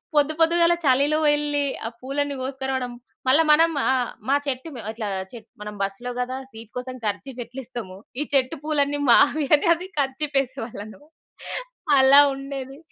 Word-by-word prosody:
పొద్దు 295 Hz, +1 st, +3 dB
పొద్దుగాల 335 Hz, +1 st, +4 dB
చలిలో 280 Hz, +4 st, +3 dB
వెళ్ళి, 295 Hz, -1 st, +1 dB, 0.2 s
ఆ -, -, -3 dB
పూలన్నీ 280 Hz, +2 st, -2 dB
గోసకరావడం. 265 Hz, -1 st, -3 dB, 0.4 s
మళ్ళా 295 Hz, +5 st, +6 dB
మనం 330 Hz, +2 st, +5 dB, 0.2 s
ఆహ్, 255 Hz, -2 st, 0 dB, 0.2 s
మా 280 Hz, -, +4 dB
చెట్టు 260 Hz, +3 st, -3 dB
మేం 230 Hz, -4 st, -8 dB
ఇట్లా 220 Hz, -1 st, -5 dB, 0.2 s
చెట్ 235 Hz, -3 st, -11 dB
మనం 210 Hz, 0 st, -6 dB
బస్సులో 195 Hz, +6 st, -3 dB
గదా 255 Hz, +1 st, -2 dB
సీట్ 225 Hz, 0 st, -12 dB
కోసం 255 Hz, 0 st, -5 dB
కర్చీఫెట్లిస్తమో, 240 Hz, -2 st, -6 dB, 0.2 s
ఈ -, -, +2 dB
చెట్టు 270 Hz, +4 st, +2 dB
పూలన్నీ 290 Hz, -1 st, +1 dB
మావి 290 Hz, +3 st, +5 dB
అని, 295 Hz, -, -1 dB
అది 360 Hz, +3 st, -8 dB
కర్చీఫేసేవాళ్ళన్నమా 270 Hz, -3 st, -3 dB, 0.9 s
అలా 265 Hz, +2 st, +8 dB, 0.2 s
ఉండేది. 275 Hz, 0 st, -7 dB
270 Hz, 140 wpm, -24 LUFS, 245-290 Hz, 0.9 s, అలా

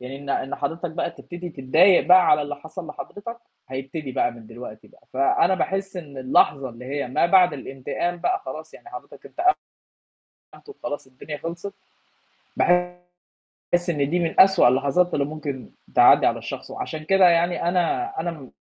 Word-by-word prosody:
يعني 130 Hz, +2 st, -7 dB
إن 140 Hz, 0 st, -11 dB
إن 135 Hz, -, -1 dB
حضرتك 165 Hz, +1 st, -3 dB
بقى 165 Hz, -, -2 dB
تبتدي 175 Hz, 0 st, -9 dB
تتضايق 160 Hz, +7 st, +4 dB
بقى 180 Hz, 0 st, +7 dB
على 150 Hz, 0 st, +4 dB
اللي 145 Hz, 0 st, -5 dB
حصل 160 Hz, +4 st, -9 dB
لحضرتك 205 Hz, +9 st, -8 dB, 0.3 s
هيبتدي 135 Hz, +1 st, -6 dB
بقى 125 Hz, -, +1 dB
من 115 Hz, -2 st, -13 dB
دلوقتي 115 Hz, -2 st, -11 dB
بقى، -, -, -25 dB
فأنا 140 Hz, +7 st, +3 dB
باحس 195 Hz, 0 st, -2 dB
إن 145 Hz, -6 st, -8 dB
اللحظة 130 Hz, +1 st, +2 dB
اللي 120 Hz, +1 st, -11 dB
هي 140 Hz, 0 st, -3 dB
ما 130 Hz, +7 st, +2 dB
بعد 180 Hz, -1 st, +5 dB
الانتقام 135 Hz, +6 st, -4 dB
بقى 375 Hz, -, -1 dB
خلاص -, -, -8 dB
يعني -, -, -14 dB
حضرتك 370 Hz, 0 st, -11 dB
انتقمت 370 Hz, +2 st, -1 dB, 1.0 s
وخلاص، 145 Hz, -, -6 dB
الدنيا 145 Hz, +3 st, -8 dB
خِلصت، 170 Hz, +6 st, -6 dB, 0.8 s
باحس 180 Hz, 0 st, 0 dB, 0.7 s
إن 145 Hz, -4 st, 0 dB
دي 175 Hz, +2 st, +1 dB
من 165 Hz, -1 st, -1 dB
أسوأ 190 Hz, -7 st, +6 dB
اللحظات 140 Hz, +8 st, +2 dB
اللي 140 Hz, -, +1 dB
ممكن 145 Hz, -3 st, -6 dB, 0.2 s
تعدّي -, -, +7 dB
على -, -, 0 dB
الشخص، -, -, -7 dB
وعشان 155 Hz, -1 st, -6 dB
كده 195 Hz, +3 st, +4 dB
يعني 170 Hz, +1 st, +1 dB
أنا 185 Hz, -, 0 dB
أنا 175 Hz, -, -2 dB
م 140 Hz, -6 st, -12 dB
160 Hz, 165 wpm, -23 LUFS, 135-180 Hz, 1.0 s, بقى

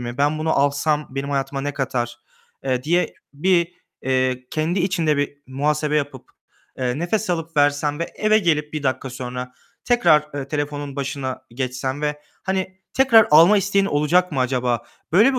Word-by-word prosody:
mi, 120 Hz, +1 st, -6 dB
ben 145 Hz, +2 st, +2 dB
bunu 160 Hz, +1 st, -1 dB
alsam 145 Hz, +2 st, +1 dB
benim 135 Hz, +1 st, -4 dB
hayatıma 135 Hz, 0 st, -1 dB
ne 145 Hz, +1 st, -2 dB
katar?" 120 Hz, -4 st, -2 dB, 0.5 s
eee, 130 Hz, -2 st, 0 dB
diye 175 Hz, +5 st, +1 dB, 0.2 s
bir, 170 Hz, +3 st, +2 dB, 0.3 s
eee, 130 Hz, -1 st, 0 dB
kendi 160 Hz, +4 st, 0 dB
içinde 170 Hz, -5 st, +1 dB
bir 145 Hz, 0 st, -2 dB
muhasebe 150 Hz, +3 st, 0 dB
yapıp, 140 Hz, -3 st, -3 dB, 0.5 s
eee, 125 Hz, +1 st, -1 dB
nefes 185 Hz, +4 st, -1 dB
alıp 165 Hz, -2 st, -3 dB
versen 145 Hz, 0 st, +2 dB
ve 170 Hz, -, 0 dB
eve 215 Hz, 0 st, +3 dB
gelip 150 Hz, -6 st, 0 dB
1 155 Hz, -1 st, -3 dB
dakika 130 Hz, 0 st, -1 dB
sonra 125 Hz, 0 st, -6 dB, 0.3 s
tekrar, 160 Hz, -, +4 dB
ııı, 140 Hz, -1 st, -4 dB
telefonun 145 Hz, -1 st, -3 dB
başına 135 Hz, -2 st, -3 dB
geçsen 130 Hz, +2 st, -3 dB
ve 150 Hz, 0 st, -1 dB, 0.2 s
hani 190 Hz, 0 st, -2 dB, 0.2 s
tekrar 235 Hz, -5 st, +6 dB
alma 165 Hz, +7 st, +7 dB
isteğin 200 Hz, 0 st, +2 dB
olacak 175 Hz, +3 st, +2 dB
mı 135 Hz, -, 0 dB
acaba? 125 Hz, -2 st, 0 dB, 0.3 s
Böyle 215 Hz, +10 st, +6 dB
bir 255 Hz, -, 0 dB
145 Hz, 165 wpm, -22 LUFS, 130-170 Hz, 0.5 s, alma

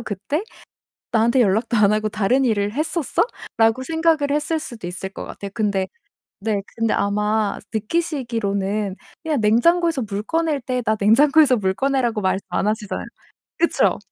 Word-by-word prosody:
그때 225 Hz, -, -3 dB, 0.7 s
'나한테 235 Hz, +3 st, +3 dB
연락도 220 Hz, +3 st, +1 dB
안 210 Hz, -1 st, +5 dB
하고 215 Hz, 0 st, +1 dB
다른 220 Hz, +6 st, +1 dB
일을 205 Hz, -2 st, 0 dB
했었어?' 310 Hz, +4 st, 0 dB, 0.3 s
라고 225 Hz, +3 st, +3 dB
생각을 320 Hz, -2 st, +1 dB
했을 305 Hz, +2 st, 0 dB
수도 235 Hz, -, -8 dB
있을 185 Hz, +2 st, -5 dB
것 -, -, -8 dB
같아요. 200 Hz, -, -7 dB
근데 200 Hz, -4 st, 0 dB, 0.5 s
네, 205 Hz, -1 st, -1 dB, 0.2 s
근데 225 Hz, -1 st, +1 dB
아마 210 Hz, +1 st, 0 dB
느끼시기로는 215 Hz, -, -1 dB, 0.3 s
그냥 310 Hz, -5 st, -1 dB
냉장고에서 320 Hz, +8 st, +3 dB
물 205 Hz, -1 st, -4 dB
꺼낼 320 Hz, -2 st, 0 dB
때 250 Hz, 0 st, -2 dB
나 220 Hz, -1 st, +1 dB
냉장고에서 275 Hz, +6 st, +5 dB
물 190 Hz, -1 st, 0 dB
꺼내라고 245 Hz, -3 st, 0 dB
말씀 190 Hz, +1 st, 0 dB
안 180 Hz, +3 st, 0 dB
하시잖아요. 215 Hz, -1 st, -2 dB, 0.5 s
그쵸? 335 Hz, -, +2 dB
225 Hz, 330 characters per minute, -21 LUFS, 205-280 Hz, 0.7 s, 안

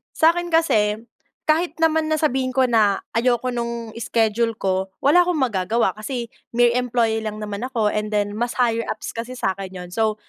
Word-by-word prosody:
Sa'kin 345 Hz, +2 st, +3 dB
kasi 220 Hz, -9 st, +2 dB, 0.4 s
kahit 320 Hz, +1 st, +1 dB
naman 320 Hz, -1 st, +2 dB
na 315 Hz, -, +1 dB
sabihin 265 Hz, -4 st, 0 dB
ko 265 Hz, -, +4 dB
na 220 Hz, -5 st, +2 dB
ayoko 245 Hz, +1 st, +1 dB
nung 235 Hz, -1 st, -4 dB
schedule 230 Hz, 0 st, +1 dB
ko 190 Hz, -1 st, -1 dB, 0.2 s
wala 295 Hz, +6 st, +6 dB
akong 360 Hz, -, +1 dB
magagawa 225 Hz, -5 st, +1 dB
kasi 230 Hz, +3 st, -5 dB, 0.2 s
mere 240 Hz, 0 st, +5 dB
employee 235 Hz, -3 st, +1 dB
lang 215 Hz, -1 st, -5 dB
naman 205 Hz, -1 st, -5 dB
ako 225 Hz, -5 st, 0 dB
and 210 Hz, 0 st, -2 dB
then 205 Hz, 0 st, +1 dB
mas 235 Hz, +3 st, -2 dB
higher 230 Hz, -2 st, +1 dB
ups 215 Hz, -, -4 dB
kasi 235 Hz, +2 st, -6 dB
sakin 190 Hz, -5 st, -3 dB
'yon. 180 Hz, -1 st, -8 dB
So, 220 Hz, +2 st, +1 dB
235 Hz, 175 wpm, -22 LUFS, 215-255 Hz, 0.4 s, wala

